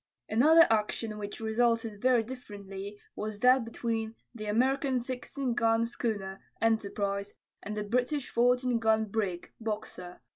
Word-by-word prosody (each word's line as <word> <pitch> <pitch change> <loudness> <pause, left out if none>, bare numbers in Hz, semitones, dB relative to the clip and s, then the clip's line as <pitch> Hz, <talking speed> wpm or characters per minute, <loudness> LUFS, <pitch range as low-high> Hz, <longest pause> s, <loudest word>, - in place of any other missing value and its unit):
Another 315 +9 +6
action 215 0 0
which 205 0 -5
resulted 225 -1 0
very 250 -3 +4
differently 205 -4 -8 0.2
was 210 -1 -4
that 255 0 +6
between 225 -1 -3 0.2
the 215 -3 -7
American 260 +4 +2
16 255 +1 -3
gun 230 -1 +2
schooner, 205 -5 -3 0.2
Enterprise, 205 -2 0 0.3
and 210 +1 -5
the 210 - -1
British 250 +6 0
14 245 0 +3
gun 220 -1 +3
brig, 200 -4 -3
Boxer. 210 -5 -5
225 Hz, 125 wpm, -30 LUFS, 210-245 Hz, 0.3 s, Another